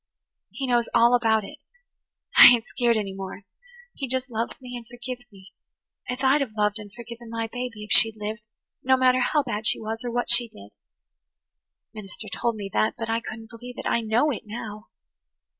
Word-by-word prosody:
He 275 - -5
knows 240 -2 +1
all 235 +1 +5
about 225 -3 +3
it. - - -10 0.8
I - - +12
ain't 245 -2 +5
skeered 235 -2 +1
any 200 -3 -3
more. 195 +1 -8 0.5
He 275 - -5
just 260 +1 -3
loves 230 +1 -3
me 250 -1 -9
and 235 -2 -8
forgives 245 0 -8
me 195 0 -17 0.6
as 250 +2 -4
I'd 270 +2 +4
have 230 -6 -3
loved 210 +1 +1
and 205 -1 -10
forgiven 235 +1 -10
my 230 0 -3
baby 235 -2 -6
if 210 - -10
she'd 225 -1 +6
lived, 215 +2 -5 0.4
no 260 0 +3
matter 255 0 +4
how 290 +3 +2
bad 215 -4 -3
she - - +3
was, 225 +1 -5
or 245 - -3
what 245 +1 -1
she 240 0 +4
did. 100 - -15 1.2
The 215 - -8
minister 210 +1 -8
told 235 +3 -1
me 205 -2 -5
that 215 - +1
but 225 -1 -3
I 225 - +1
couldn't 225 -1 -9
believe 245 +2 -10
it. - - -6
I 235 - +1
know 230 +7 +2
it 240 - -4
now. 215 -1 -8
230 Hz, 200 wpm, -25 LUFS, 215-245 Hz, 1.2 s, I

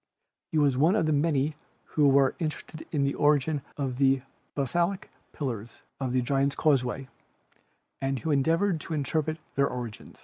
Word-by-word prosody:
He 160 - 0
was 140 -4 +3
one 160 +8 +4
of 215 - +2
the 155 - +2
many 150 0 +1 0.3
who 150 -2 +3
were 135 -1 +4
interested 155 -1 -5
in 145 -3 +1
the 140 0 +1
origin 150 0 +2 0.2
of 135 -3 -2
the 135 -1 +3 0.3
basaltic 170 +7 0 0.2
pillars 120 -6 -5 0.2
of 130 -2 -2
the 125 0 +1
Giants' 140 +2 +1
Causeway 135 -2 +1 0.9
and 135 0 0
who 160 +4 -2
endeavored 165 +5 +2
to 160 - -4
interpret 155 +2 -1 0.2
their 140 0 +3
origin. 120 -4 -6
140 Hz, 160 wpm, -28 LUFS, 135-155 Hz, 0.9 s, one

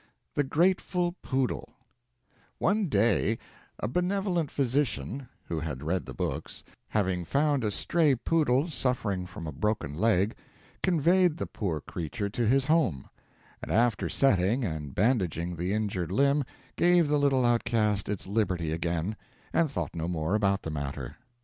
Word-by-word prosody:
THE 145 - +2
GRATEFUL 175 +4 +1
POODLE 130 -2 -2 0.8
One 205 0 +1
day 110 - +2 0.4
a - - -2
benevolent 180 - 0
physician 135 0 -1 0.2
(who 80 - -3
had 75 -4 -5
read 90 +4 -1
the 65 - -6
books) - - -4 0.2
having 95 -4 0
found 140 - +1
a 105 - +1
stray 150 - +2
poodle 145 +1 +2
suffering 115 - -1
from 85 -2 -8
a 80 - -4
broken 105 -3 -1
leg, 100 +3 +2 0.5
conveyed 175 0 +3
the - - -2
poor 85 -8 -3
creature 100 +8 -4
to 120 +1 0
his 135 +3 +3
home, 150 - +1 0.5
and - - -5
after 115 -1 +2
setting 115 0 +2
and 75 -6 -4
bandaging 90 -6 +1
the 90 +3 -2
injured 100 -5 -1
limb 140 +5 +3 0.3
gave 175 -2 +4
the 150 0 +2
little 135 -3 +3
outcast 110 -4 +1
its 105 -2 -2
liberty 95 -6 0
again, 85 +4 -1 0.4
and 165 -2 +3
thought 135 - -3
no 80 0 -2
more 80 0 -1
about 100 -2 +2
the 80 - -4
matter. 70 -3 -5
110 Hz, 145 wpm, -28 LUFS, 90-145 Hz, 0.8 s, gave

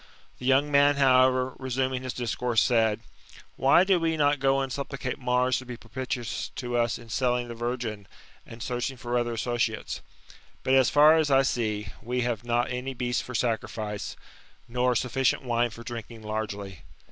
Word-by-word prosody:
The 125 - -4
young 140 +2 +3
man, 145 0 +5
however, 130 -1 +4
resuming 130 0 -1
his 130 -1 -5
discourse, 120 -1 0
said: 110 -3 +2 0.5
Why 135 +6 +5
do 190 -2 +3
we 165 -1 0
not 145 -1 +3
go 135 0 +3
and 135 -2 -2
supplicate 135 -2 -4
Mars 125 0 +1
to 130 - -10
be 125 -1 -6
propitious 120 0 -4
to 120 -1 -4
us 120 -1 +1
in 120 -1 -14
selling 125 0 0
the - - -5
virgin, 115 -3 -4 0.4
and 115 +1 -9
searching 125 +1 -3
for 120 0 -3
other 120 -1 0
associates? 115 -1 -2 0.6
But, 130 - +1
as 130 -1 +5
far 150 +2 +6
as 155 -2 +2
I 135 -1 +5
see, 110 -5 -1
we 125 +3 -2
have 120 -2 -2
not 120 +1 0
any 130 +1 -4
beast 125 0 -1
for 125 - -8
sacrifice, 110 -3 -2 0.5
nor 125 +1 +1
snfficient 130 +3 +1
wine 120 -1 +1
for 115 +1 -11
drinking 115 -1 -8
largely. 105 -4 -5
125 Hz, 170 wpm, -27 LUFS, 115-130 Hz, 0.6 s, far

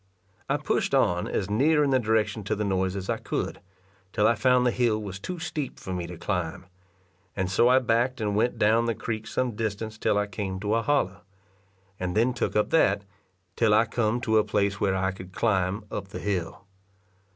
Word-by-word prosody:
I - - +2
pushed - - 0
on 90 0 +2
as 95 - -2
near 150 +9 +3
in 140 - +1
the 130 - +4
direction 110 -1 0
to 100 - 0
the 105 - -2
noise 95 -1 0
as 95 -1 -5
I - - 0
could, - - -4 0.5
till 105 +1 +1
I - - +5
found 125 0 +3
the 125 - +3
hill 115 -3 +1
was 100 -3 -6
too 180 - -5
steep 155 -4 -4
for 95 - -6
me 90 -1 -3
to 90 0 -8
climb, 90 -2 -3 0.7
and 95 -1 -1
so 105 +5 +4
I 130 - +6
backed 125 +1 +1
and 105 -2 -1
went 115 +4 +1
down 115 +2 +3
the 115 -1 0
creek 110 -2 -4
some 130 -1 -1
distance 110 0 -4
till 105 - +1
I 105 - +2
came 95 -1 -4
to 105 +1 0
a 115 - +2
hollow, 115 -8 0 0.8
and 90 +2 -2
then 120 +3 +3
took 120 - -2
up 105 - +1
that, 100 -10 +3 0.5
till 110 -3 +3
I 110 +2 +5
come 115 +1 0
to 110 -2 +3
a - - +3
place 100 -1 0
where 95 -1 +2
I 95 0 0
could 95 -1 -11
climb 100 -1 0
up 100 - -4
the - - -8
hill. 95 -3 -3
105 Hz, 210 wpm, -26 LUFS, 95-115 Hz, 0.8 s, I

